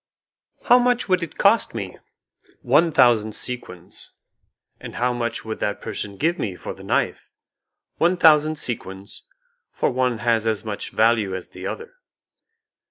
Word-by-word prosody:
"How 245 - +6
much 245 0 +1
would 185 -2 +2
it 170 - -6
cost - - +3
me?" - - -5 0.6
"One 165 +1 +4
thousand 110 -6 +4
sequins." 90 -9 -5 0.6
"And - - -9
how 125 +1 +1
much 115 -2 -3
would 110 0 -5
that 105 - -2
person 100 -1 -5
give 170 - 0
me 95 -5 -2
for - - -7
the - - -13
knife?" - - -1 0.7
"One 175 +2 +2
thousand 155 -2 +5
sequins, 100 -8 -5 0.4
for - - -1
one 125 -2 0
has 115 -1 +1
as 110 0 -1
much 105 -2 -3
value 110 -4 +2
as 95 - -7
the - - -7
other." 460 +2 -6
120 Hz, 150 wpm, -23 LUFS, 105-160 Hz, 0.7 s, How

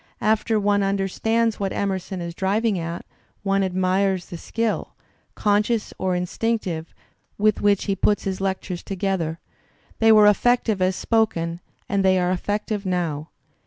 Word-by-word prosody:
After 220 +1 +2
one 205 0 +2
understands 200 +4 0
what 195 -1 -1
Emerson 190 -1 -2
is 170 0 -5
driving 200 +2 0
at, 170 +1 -5 0.4
one 195 0 +2
admires 185 0 +1
the 175 - -8
skill; 225 +3 -2 0.4
conscious 210 +2 +1
or 185 -1 0
instinctive, 180 -2 -2 0.5
with 215 0 +2
which 205 -1 +3
he 195 - 0
put 205 +2 +2
his 190 -1 -3
lectures 190 -2 -2
together; 190 -4 -2 0.6
they 225 0 +6
were 215 -1 +7
effective 220 -1 +3
as 185 0 +2
spoken, 175 -8 0 0.3
and 200 -1 +1
they 190 0 +4
are 180 0 +1
effective 205 +2 -2
now. 165 -5 -2
195 Hz, 140 wpm, -23 LUFS, 185-210 Hz, 0.6 s, were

